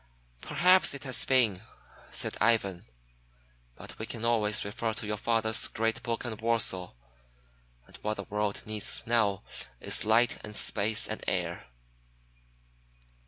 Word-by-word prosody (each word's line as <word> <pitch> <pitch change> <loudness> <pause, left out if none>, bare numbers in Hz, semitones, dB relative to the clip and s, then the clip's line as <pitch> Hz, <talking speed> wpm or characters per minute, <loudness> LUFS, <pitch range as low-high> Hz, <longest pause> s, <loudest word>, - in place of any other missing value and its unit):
"Perhaps 180 +1 +4
it 140 - -9
has 130 -3 -1
been," 115 -8 +3 0.5
said - - -2
Ivan. 105 -5 +2 0.9
"But - - -11
we 110 - -5
can 115 -1 -5
always 105 -4 +1
refer 110 +1 -3
to - - -3
your 105 0 -2
father's 115 +2 +1
great 115 0 -2
book 115 +1 -3
on 115 -2 -3
Warsaw, 110 -5 0 0.9
and - - -17
what 105 0 -3
the 100 - -6
world 105 0 -3
needs 110 -1 -2
now 110 -5 +1 0.4
is - - +1
light 115 +3 +3
and 105 0 -8
space 105 +1 +2
and - - -5
air." 60 - -2
110 Hz, 135 wpm, -29 LUFS, 105-115 Hz, 0.9 s, Perhaps